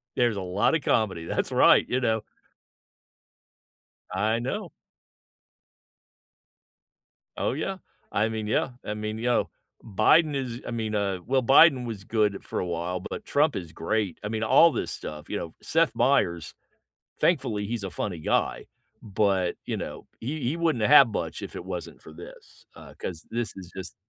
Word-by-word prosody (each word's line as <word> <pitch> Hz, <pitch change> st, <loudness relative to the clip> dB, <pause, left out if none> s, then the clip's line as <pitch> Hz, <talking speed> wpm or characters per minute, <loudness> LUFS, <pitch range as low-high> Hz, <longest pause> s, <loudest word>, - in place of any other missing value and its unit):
There's 120 Hz, -3 st, +2 dB
a 100 Hz, -, -3 dB
lot 95 Hz, -, +1 dB
of 160 Hz, -, 0 dB
comedy, 95 Hz, -10 st, 0 dB
that's -, -, -2 dB
right, -, -, +6 dB
you 130 Hz, +1 st, 0 dB
know. 110 Hz, -2 st, +1 dB, 1.9 s
I 110 Hz, +2 st, 0 dB
know. 125 Hz, +3 st, -4 dB, 2.7 s
Oh, -, -, 0 dB
yeah. 185 Hz, +7 st, -3 dB, 0.3 s
I 105 Hz, +2 st, +2 dB
mean, 110 Hz, -1 st, -4 dB
yeah, 125 Hz, +4 st, 0 dB
I 105 Hz, -, -2 dB
mean, 105 Hz, 0 st, -4 dB
you 115 Hz, -, -5 dB
know, 125 Hz, -, +2 dB, 0.4 s
Biden 145 Hz, -, +4 dB
is 125 Hz, -3 st, -4 dB
I -, -, -4 dB
mean, 110 Hz, -2 st, -2 dB
uh, 100 Hz, -2 st, -1 dB
well, 130 Hz, +1 st, +2 dB
Biden 135 Hz, +1 st, +6 dB
was 110 Hz, -5 st, -6 dB
good 105 Hz, -1 st, 0 dB
for -, -, -4 dB
a -, -, -1 dB
while, 85 Hz, +1 st, -3 dB
but, 155 Hz, -, -7 dB
Trump 145 Hz, +1 st, +2 dB
is 85 Hz, -4 st, -5 dB
great. 100 Hz, +1 st, -2 dB
I -, -, -2 dB
mean, 110 Hz, 0 st, -2 dB
all 165 Hz, +9 st, +6 dB
this -, -, -3 dB
stuff, 75 Hz, -1 st, -8 dB
you -, -, -2 dB
know, -, -, -6 dB
Seth -, -, +1 dB
Meyers, 85 Hz, -2 st, +1 dB, 0.7 s
thankfully, 125 Hz, -, +1 dB
he's 115 Hz, -2 st, -3 dB
a 95 Hz, -, -4 dB
funny 90 Hz, -3 st, -4 dB
guy, -, -, 0 dB, 0.4 s
but, 100 Hz, -3 st, 0 dB
you -, -, -2 dB
know, -, -, -7 dB
he 145 Hz, +6 st, -4 dB
he 130 Hz, +7 st, -1 dB
wouldn't 160 Hz, -10 st, +1 dB
have 140 Hz, -1 st, +8 dB
much 105 Hz, -, -4 dB
if -, -, -7 dB
it -, -, -6 dB
wasn't 90 Hz, -3 st, -6 dB
for 80 Hz, -, -12 dB
this, 85 Hz, -, -13 dB
uh, -, -, -12 dB
'cause 85 Hz, -3 st, -6 dB
this 120 Hz, 0 st, -2 dB
is 90 Hz, -2 st, -10 dB
just 95 Hz, -, -6 dB
110 Hz, 170 wpm, -26 LUFS, 95-125 Hz, 2.7 s, have